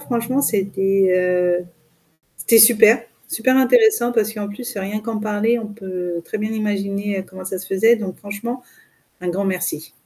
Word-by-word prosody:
Franchement 255 0 -1
c'était, 195 -4 +1 0.5
heu, - - -16 0.7
c'était 230 - +3
super, 225 +1 +7 0.3
super 255 +3 +1
intéressant 425 - +4
parce 220 -2 0
qu'en 205 -2 -5
plus 240 +4 -8
rien 200 +2 -3
qu'en 215 0 -4
parler, 215 +2 0
on 220 -2 -6
peut 185 -5 -6
très 215 - -5
bien 215 +1 -3
imaginer, 200 -2 -2
heu, - - -5
comment 185 0 -12
ça 190 +1 -4
se 180 - -9
faisait 225 +5 +3
donc 200 -5 -6
franchement 220 +5 -6 0.6
un 180 - -3
grand 195 +3 -2
merci. 180 -4 -3
210 Hz, 165 wpm, -20 LUFS, 195-230 Hz, 0.7 s, super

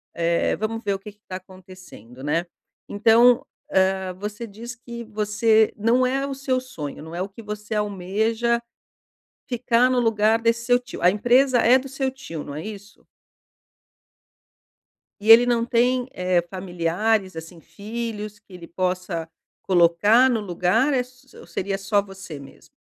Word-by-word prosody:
Eh, 170 0 +1
vamos 225 +4 -4
ver 200 -1 0
o - - -7
que 210 +1 -10
que 210 +1 -31
tá 185 - -6
acontecendo, 185 - -13
né? 165 +4 0 0.4
Então, 230 +4 +4 0.3
hã, 190 0 +1
você 210 +4 -6
diz 230 +4 -9
que 235 -1 -9
você 215 +1 +2
não 235 +4 +2
é 270 +2 -1
o 275 - -4
seu 265 -1 -1
sonho, 155 - -8
não 160 - -10
é 175 - -3
o 195 - -3
que 200 +4 -12
você 210 +1 -5
almeja 215 +4 0 0.9
ficar 245 0 +2
no 255 - +1
lugar 225 -1 +2
desse 230 0 +1
seu 245 0 +4
tio. 245 -6 -10
A 180 - +6
empresa 245 +5 +3
é 245 +3 +5
do 270 - -8
seu 270 0 -2
tio, 165 - -8
não 140 - -8
é 155 - -6
isso? 205 -1 -10 2.2
E 215 - -3
ele 230 +2 +10
não 235 -1 +1
tem, 245 +1 +1
eh, 180 -1 +1
familiares, 185 +2 -1
assim, 160 +1 -9
filhos, 210 +3 -6
que 205 - -26
ele 175 -2 -10
possa 180 -2 -3 0.3
colocar 190 +8 +4
no 235 -4 +1
lugar 205 +9 +1
é - - +2
s 250 +2 -15
ou - - -12
seria 195 +3 -3
só 200 +1 +1
você 195 -6 -10
mesmo? 140 - -15
210 Hz, 165 wpm, -23 LUFS, 185-235 Hz, 2.2 s, ele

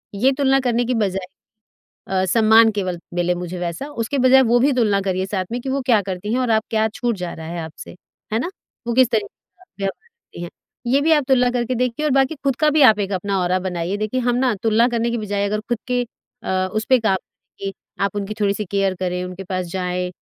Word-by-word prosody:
ये 255 +7 +3
तुलना 270 -1 +3
करने 245 -2 +1
की 250 - 0
बजाय 195 -4 -1 0.8
अ, 190 -1 0
"सम्मान 220 +3 +5
केवल 185 -4 -2 0.2
मिले 175 0 +1
मुझे" 180 0 -5
वैसा। 175 - -4 0.2
उसके 280 +5 -2
बजाय 265 +1 +7
वो 245 - +5
भी 280 +3 +3
तुलना 210 -5 +2
करिए 185 0 0
साथ 190 -1 -2
में 240 - -2
कि 265 - -5
वो 275 +1 0
क्या 230 -5 +4
करती 195 +3 -4
हैं 255 - +1
और 250 -2 +1
आप 220 0 +3
क्या 220 0 +2
छूट 240 -2 -1
जा 170 - -4
रहा 160 - -8
है 170 0 -5
आपसे, 160 +2 -9 0.4
है 220 - +2
ना? 345 - -2 0.4
वो 235 - 0
किस 255 -1 +5
तरीके 215 -3 +1 0.3
का 370 - -21 0.2
व्यवहार 195 - -3
करती 465 - -14
हैं। 170 - -6 0.4
ये 280 - +4
भी 320 +2 +2
आप 295 -3 +4
तुलना 250 -2 +4
करके 245 0 -1
देखिए 250 +4 -1
और 300 - +2
बाकी 270 +4 +1
खुद 275 -2 +1
का 305 -1 +4
भी 300 0 +3
आप 215 - -5
एक 200 0 -2
अपना 195 +1 -1
औरा 180 +1 +1
बनाइए। 180 +1 -3
देखिए, 215 +5 -1
हम 245 0 +1
ना 255 -1 +2
तुलना 225 +2 +4
करने 235 -1 0
की 235 - -1
बजाय 205 -2 -1
अगर 210 +1 -1
खुद 240 - +1
के 250 0 +1 0.4
अ, 185 0 0
उस 215 0 -1
पे 260 - +7
काम 220 -4 +2 0.4
कि 195 0 -4 0.3
आप 200 0 0
उनकी 205 +1 -3
थोड़ी-सी 205 0 0
केयर 195 -1 +1
करें, 180 0 -2
उनके 180 +1 -7
पास 185 -1 -3
जाएँ। 180 -1 -2
215 Hz, 235 wpm, -21 LUFS, 185-245 Hz, 0.8 s, बजाय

